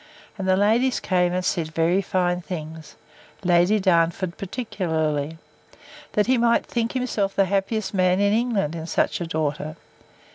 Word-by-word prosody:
And 195 -2 -4
the 185 0 +3
ladies 230 +6 +2
came, 180 -2 +1
and 180 0 -2
said 160 -4 -2
very 170 +4 +2
fine 180 -1 0
things: 160 -3 -7 0.5
Lady 180 +4 +3
Darnford 170 -1 +1
particularly, 160 - -2 0.8
That 210 - +2
he 255 0 +2
might 235 0 +3
think 230 -1 -2
himself 225 -6 -1
the 195 - +3
happiest 200 +3 -1
man 185 -1 +2
in 200 0 +3
England, 220 -9 0
in 165 -1 -6
such - - 0
a 170 - -3
daughter. 155 -1 -2
185 Hz, 150 wpm, -23 LUFS, 165-205 Hz, 0.8 s, the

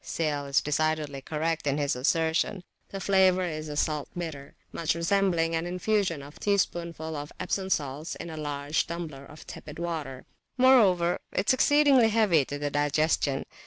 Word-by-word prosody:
Sale 145 -3 -2
is 140 - +2
decidedly 150 -1 -1
correct 160 +2 -2
in 140 0 +1
his 145 -3 0
assertion: 160 +7 0 0.3
the 195 - -6
flavour 190 -1 +3
is 155 -3 -4
a 150 - -5
salt 150 -1 -1
bitter, 155 -5 -6 0.2
much 165 -1 -1
resembling 170 -2 +1
an 165 +1 -1
infusion 180 -4 0
of 145 +2 -12
a - - -18
teaspoonful 170 -5 -1
of 145 0 -6
Epsom 190 -1 -2
salts 150 0 -2
in 170 - -7
a - - -7
large 145 0 -2
tumbler 160 -5 -6
of 150 - -13
tepid 150 - -10
water. 155 -6 -5 0.3
Moreover, 205 -10 +4
it 195 - -1
is - - +7
exceedingly 275 -3 +5
heavy 210 -9 +3
to 145 - -5
the 145 0 -3
digestion. 145 -1 +1
160 Hz, 165 wpm, -27 LUFS, 145-180 Hz, 0.3 s, is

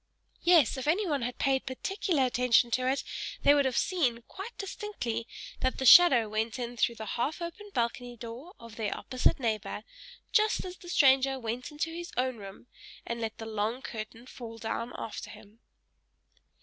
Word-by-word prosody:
Yes! 330 -8 +5
if 260 - -4
anyone 320 -4 +1
had 245 +1 -3
paid 270 -1 +1
particular 300 +2 0
attention 245 -1 +3
to 255 +1 +1
it, 270 - 0 0.4
they 285 - +7
would 285 -1 +3
have 255 -2 0
seen, 255 -11 +1
quite 410 +5 -8
distinctly, 385 - -4 0.3
that 260 - 0
the 265 - -2
shadow 260 -5 +9
went 220 +2 -2
in 245 -1 -4
through 235 0 +1
the 220 -1 -7
half 240 - -2
open 345 +5 -7
balcony 240 -2 -2
door 240 - -9
of 230 -1 -12
their 215 -3 -2
opposite 255 +1 +1
neighbor, 215 -3 -2 0.5
just 425 -2 +2
as 365 0 -7
the 350 - -12
stranger 270 -4 +4
went 240 +2 -4
into 305 +2 -3
his 345 +1 -6
own 255 -1 0
room, 195 +2 -10 0.4
and 235 0 -4
let 220 -1 -3
the 225 - -7
long 220 +3 -2
curtain 225 +1 -7
fall 235 -3 -9
down 230 +2 -3
after 220 - -6
him. 210 +2 -14
250 Hz, 175 wpm, -30 LUFS, 230-295 Hz, 0.5 s, shadow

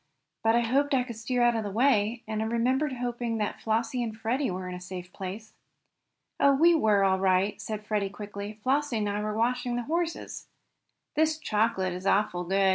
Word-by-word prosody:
But 225 +1 +4
I 240 - +4
hoped 275 +4 +2
I 255 - +2
could 240 -2 -7
steer 240 +2 0
out 240 -1 +4
of 225 - -1
the 205 - -3
way, 225 0 +2
and 215 0 -2
I - - 0
remember 250 +6 +1
hoping 240 -1 -2
that 210 -1 -3
Flossie 230 +3 0
and 220 -2 -4
Freddie 240 +5 0
were 185 0 -4
in 180 - -5
a 180 - -7
safe 180 0 -8
place." 200 +3 -7 0.9
"Oh, 280 -1 +5
we 335 +5 +6
were 215 -10 +3
all 190 -1 +3
right," 190 +2 +2
said 215 -1 -5
Freddie 210 -2 0
quickly. 205 +1 -7
"Flossie 275 -1 +1
and 210 -1 0
I 205 +1 -1
were 210 0 -2
watching 245 +1 0
the 245 - -2
horses. 335 +4 -3 0.7
This 315 0 +2
chocolate 210 - 0
is 185 +2 -5
awful 185 -3 +1
good!" 195 +2 +3
220 Hz, 200 wpm, -28 LUFS, 200-245 Hz, 0.9 s, we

